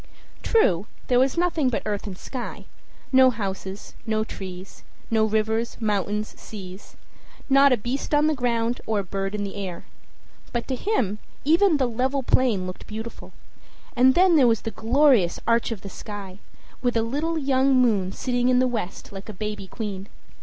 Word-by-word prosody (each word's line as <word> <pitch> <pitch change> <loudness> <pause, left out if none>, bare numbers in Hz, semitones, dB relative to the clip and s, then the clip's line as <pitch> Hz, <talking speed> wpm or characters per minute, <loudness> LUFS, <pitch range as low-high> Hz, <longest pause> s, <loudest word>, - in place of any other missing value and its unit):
True, 205 - +2 0.2
there 245 -1 +4
was 265 +4 +2
nothing 335 -6 +2
but 240 - -2
earth 210 -1 -2
and 185 -2 -6
sky; 250 +3 -6 0.5
no 260 -1 +7
houses, 195 -3 -5
no 220 -1 0
trees, 190 -3 -8 0.3
no 220 -1 +3
rivers, 220 +2 0
mountains, 210 -1 -1
seas 190 -2 -10 0.6
not 275 +1 +7
a 250 - +4
beast 240 +6 -3
on 295 0 +4
the 310 - +3
ground, 240 -3 0
or 220 -1 +1
a 200 - 0
bird 195 +2 -3
in 205 - -2
the 200 - -4
air. 190 -4 -6 0.7
But 240 -1 -3
to 260 - 0
him 245 - -1 0.3
even 330 +2 +4
the 265 - +2
level 260 +4 -1
plain 235 -7 +2
looked 185 0 -8
beautiful; 220 +2 -7 0.6
and 260 +1 +5
then 360 -2 +5
there 265 -4 +6
was 225 -2 +2
the 225 - -4
glorious 230 - +3
arch 230 0 +2
of 225 -5 -5
the - - -8
sky, 195 -1 -8 0.4
with 245 -2 +1
a 225 - +2
little 300 +8 -1
young 270 -2 +2
moon 215 -7 +3
sitting 245 +3 0
in 250 - +4
the 255 0 +4
west 220 -6 -4
like 195 +1 -9
a - - -6
baby 210 0 -5
queen. 200 -2 -5
225 Hz, 175 wpm, -24 LUFS, 200-260 Hz, 0.7 s, no